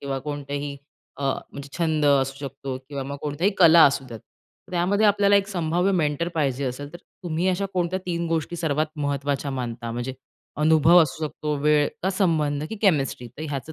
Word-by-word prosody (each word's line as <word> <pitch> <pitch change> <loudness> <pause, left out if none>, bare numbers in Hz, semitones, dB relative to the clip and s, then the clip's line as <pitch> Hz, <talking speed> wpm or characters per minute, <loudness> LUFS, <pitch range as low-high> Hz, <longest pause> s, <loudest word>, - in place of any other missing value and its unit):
किंवा 135 -1 -3
कोणत्याही 145 0 -5 0.4
अ, - - -7 0.3
म्हणजे 140 0 -8
छंद 160 -3 +1
असू 135 -1 +3
शकतो 135 0 -6
किंवा 140 -2 -4
मग 140 +1 -5
कोणत्याही 150 +7 0
कला 170 -2 +8
असू 140 -1 +2
द्यात, 115 -2 -8 0.5
त्यामध्ये 190 +4 +2
आपल्याला 205 0 +4
एक 200 0 +1
संभाव्य 175 0 0
मेंटर 165 -1 0
पाहिजे 140 -3 0
असेल, 145 +3 -5
तर - - -7 0.3
तुम्ही 170 +2 0
अशा 190 +2 0
कोणत्या 180 +1 0
3 170 -1 -2
गोष्टी 165 +1 -2
सर्वात 155 -2 0
महत्त्वाच्या 145 -1 -2
मानता, 120 -3 -4
म्हणजे 120 +2 -4 0.5
अनुभव 160 +2 +6
असू 155 +1 -3
शकतो, 150 0 -4
वेळ 150 -1 +4
का 190 - +1
संबंध 155 -7 +1
की 220 - -4
केमिस्ट्री. 140 - +1
तर 130 +6 -10
ह्याचं 145 +2 -5
150 Hz, 175 wpm, -24 LUFS, 140-170 Hz, 0.5 s, कला